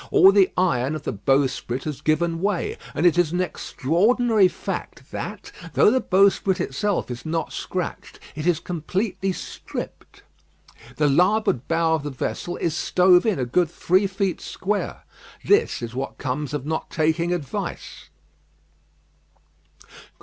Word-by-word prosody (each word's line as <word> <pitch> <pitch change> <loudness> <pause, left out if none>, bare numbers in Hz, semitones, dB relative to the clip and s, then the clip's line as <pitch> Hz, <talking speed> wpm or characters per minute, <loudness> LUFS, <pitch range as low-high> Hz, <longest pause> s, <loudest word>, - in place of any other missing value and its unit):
All 190 - +7
the 195 -2 +4
iron 155 -6 +1
of 155 - -6
the - - -3
bowsprit 130 +2 0
has 150 -3 -5
given 165 +2 0
way; 200 -2 -1 0.2
and 175 - 0
it 175 0 +5
is 165 -3 +2
an 175 - -1
extraordinary 195 - +2
fact - - -6
that, - - -6 0.2
though - - +6
the 260 - +3
bowsprit 195 0 +3
itself 180 0 -1
is 120 - -6
not 165 0 -3
scratched, - - -5
it 155 +3 -4
is 170 -3 +3
completely 185 +4 -2
stripped. - - -8 0.7
The 150 - +2
larboard 180 - +2
bow 165 -1 +2
of 160 - +1
the 145 - -4
vessel 160 +6 -4
is 165 - -1
stove 180 +2 +4
in 215 - +1
a 130 - -1
good 165 +7 +1
three 185 +4 +2
feet 195 -2 -2
square. 205 +2 -3 0.4
This 410 - +2
is 115 0 -5
what 135 +2 -4
comes 140 +2 -3
of 140 -2 -4
not 160 +1 -3
taking 165 +2 0
advice." 160 -7 -5
170 Hz, 145 wpm, -23 LUFS, 150-190 Hz, 0.7 s, All